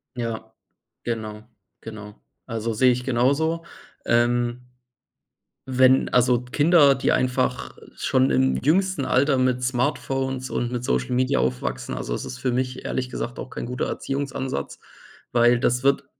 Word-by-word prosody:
Ja, 110 -2 -5 0.5
genau, 110 -2 -4 0.4
genau. 105 -1 -10 0.3
Also, 115 -1 -3
sehe 125 +3 +4
ich 125 0 -2
genauso. 140 +7 +1 0.4
Ähm 120 +1 +1 1.1
wenn, 130 0 +4
also, 125 -1 +4
Kinder, 145 +2 +4
die 135 - 0
einfach 125 0 0 0.2
schon 65 +1 +1
im 65 0 +2
jüngsten 185 - +1
Alter 130 +2 +2
mit 130 -1 +1
Smartphones 130 +1 -1
und 120 0 -2
mit 125 0 -3
Social 130 - -1
Media 130 +2 +1
aufwachsen, 65 0 -2
also, - - -4
es - - -3
ist 125 - -7
für 125 -1 -1
mich 125 0 -2
ehrlich 130 -1 -2
gesagt 120 -1 -5
auch 130 - -7
kein - - -6
guter 125 +1 -3
Erziehungsansatz, 135 - -4 0.5
weil 120 0 +4
das 125 +2 +1
wird 140 0 +2
125 Hz, 140 wpm, -23 LUFS, 120-130 Hz, 1.1 s, sehe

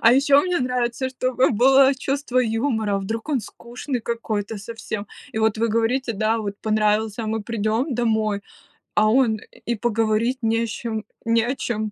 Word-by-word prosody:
А 230 +1 +6
ещё 280 +2 +5
мне 360 -1 0
нравится, 250 +1 -1
чтобы 255 0 +1
было 265 +4 +5
чувство 270 -1 -1
юмора, 225 -3 0
вдруг 225 +7 -4
он 275 -5 +1
скучный 240 +4 -6
какой-то 220 -2 -3
совсем. 215 -1 -6 0.3
И - - -3
вот 220 -1 +2
вы 230 0 +1
говорите, 230 +3 +1
да, 220 +2 +1
вот 200 -2 -4
понравился, 215 +1 +1
а - - -4
мы 220 0 -2
придём 230 +5 -1
домой, 220 -3 0 0.5
а 215 0 +4
он 225 -3 +3 0.3
и 235 - 0
поговорить 225 +2 0
не 225 +1 +1
с - - -6
чем 220 0 -4 0.2
не 230 0 +3
о 255 +3 -1
чём 215 -4 -3
230 Hz, 170 wpm, -23 LUFS, 215-250 Hz, 0.5 s, А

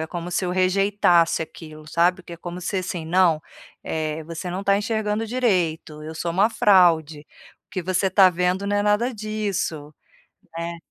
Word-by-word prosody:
é 160 - -3
como 175 +1 -6
se 185 - -1
eu 180 - -1
rejeitasse 185 -3 +2
aquilo, 155 -1 -11
sabe, 175 +3 +2
que 175 - -11
é - - -12
como 175 +1 -7
se 195 +2 -3
assim: 180 -3 -4
"Não, 175 -2 +3 0.4
é 155 0 -3
você 165 +2 -6
não 185 +2 -3
está 200 0 +2
enxergando 215 0 -1
direito, 180 -10 -1
eu 160 - -7
sou 170 +2 -3
uma 195 +6 +3
fraude, 170 -8 +3 0.5
o - - -68
que 185 - -4
você 185 +2 0
está 190 0 +6
vendo 180 +2 0
não 205 - 0
é 205 - +1
nada 210 +5 +1
disso.", 200 -8 -3 0.7
né? 170 0 -4
180 Hz, 180 wpm, -23 LUFS, 165-200 Hz, 0.7 s, está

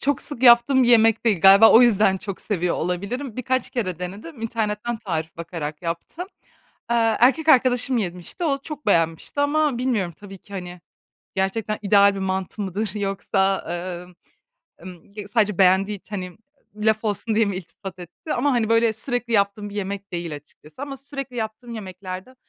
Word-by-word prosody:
çok 285 +1 0
sık 275 -4 -8
yaptığım 245 +2 +6
bir 240 - +2
yemek 225 -1 +4
değil. 205 -7 +2
Galiba 195 +4 +8
o 230 - +8
yüzden 210 -5 +4
çok 195 0 -7
seviyor 180 -4 -1
olabilirim. 200 - -3
Birkaç 255 0 -1
kere 190 - -3
denedim, 205 - -8
internetten 225 0 -2
tarif 165 -7 -4
bakarak 165 -2 -6
yaptım. 170 - -5 0.6
Eee, 225 -2 +2
erkek 265 +6 +3
arkadaşım 250 -2 +4
yemişti, 180 - -4
o 280 -4 +1
çok 300 -2 -8
beğenmişti 165 - +1
ama 290 -3 +1
bilmiyorum 225 -9 -1
tabii 195 -1 -11
ki, 200 - -19
hani, 180 -2 -7 0.6
gerçekten 205 +3 -1
ideal 200 0 +5
bir - - -4
mantı 190 +2 -3
mıdır 200 +2 -3
yoksa, 195 -1 0 0.4
emm, 180 0 -17 0.7
emm, 180 -1 -11
ya 210 -1 -7
sadece 210 -3 +1
beğendiği 195 +2 +3
için, 205 +2 -8
hani, 180 -2 -7 0.4
laf 215 +1 +1
olsun 215 +1 -1
diye 225 - +4
mi 200 -2 -2
iltifat 185 +1 -9
etti? 180 - -7
Ama, 280 +3 +1
hani, 230 -3 +1
böyle 230 0 +3
sürekli 240 +1 -3
yaptığım 205 0 +1
bir - - -11
yemek 200 -1 -5
değil 170 -3 -4
açıkçası. 150 - -14
Ama 280 -1 -6
sürekli 275 -2 -8
yaptığım 230 +1 -5
yemeklerde, 185 +2 -8
210 Hz, 170 wpm, -22 LUFS, 185-240 Hz, 0.7 s, Galiba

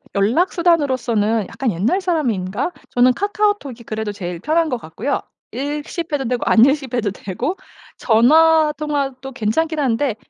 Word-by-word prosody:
연락 235 - +2
수단으로써는 250 - +1
약간 260 -5 -2
옛날 215 - 0
사람인가? 250 - -1 0.2
저는 250 +1 +4
카카오톡이 405 - -1
그래도 215 -1 -4
제일 180 -3 -6
편한 320 - +1
것 250 - -1
같고요. 230 - -3 0.3
읽씹 295 +5 -4
해도 275 -2 0
되고 245 0 -1
안읽씹 265 +2 +3
해도 215 -5 0
되고 200 - -4 0.4
전화 305 +7 +4
통화도 275 -3 -3
괜찮긴 300 +8 -1
한데 255 -2 0
265 Hz, 330 characters per minute, -19 LUFS, 225-315 Hz, 0.4 s, 저는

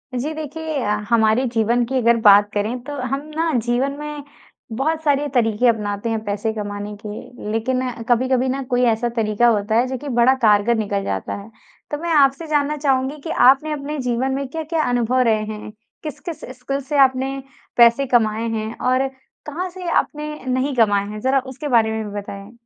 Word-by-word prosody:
जी। 290 +6 -2
देखिए 315 0 -5 0.3
हमारे 230 +2 +3
जीवन 235 +2 +2
की 265 +2 -2
अगर 235 -1 +3
बात 205 0 +7
करें 215 +4 -1
तो 290 - -7 0.2
हम 275 - -1 0.2
ना 325 +1 +1
जीवन 245 +3 +1
में 300 -1 -6 0.5
बहुत 315 +4 0
सारे 290 -1 +2
तरीके 230 -1 +2
अपनाते 210 -1 0
हैं 220 -1 -2
पैसे 205 +2 -1
कमाने 205 -1 -5
के। 210 +1 -7
लेकिन 255 +4 0 0.3
कभी-कभी 255 +1 +2
न 270 +1 -2
कोई 245 -1 +1
ऐसा 225 +2 -1
तरीका 220 +1 +2
होता 215 -1 +1
है 240 +3 +3
जो 260 0 -3
कि 290 +3 -7
बड़ा 245 +3 +6
कारगर 215 +1 +4
निकल 200 -2 -1
जाता 95 - -3
है। 200 - -13 0.4
तो 295 - -1
मैं 340 0 -2
आपसे 280 +2 +3
जानना 300 0 0
चाहूँगी 270 0 0
कि - - -6 0.2
आपने 275 +4 +3
अपने 300 0 -4
जीवन 250 +1 -1
में 275 0 -3
क्या-क्या 320 +2 -2
अनुभव 245 0 +1
रहे 220 -3 +2
हैं? 215 0 -7 0.3
किस-किस 305 +2 -6 0.2
स्किल्स 275 +1 -4
से 295 - -1
आपने 265 0 +3 0.4
पैसे 235 +3 +6
कमाए 225 -2 +2
हैं? 220 0 -3
और 255 +1 +1 0.4
कहाँ 345 +5 -4
से 360 0 -8
आपने 300 -2 -1
नहीं 260 +2 -1
कमाए 205 -4 +3
हैं? 215 0 -6
ज़रा 265 +4 +2
उसके 265 +3 -7
बारे 230 -4 +3
में 220 0 -2
भी 205 - -7
बताएँ। 200 +1 -9
250 Hz, 185 wpm, -20 LUFS, 220-280 Hz, 0.5 s, बात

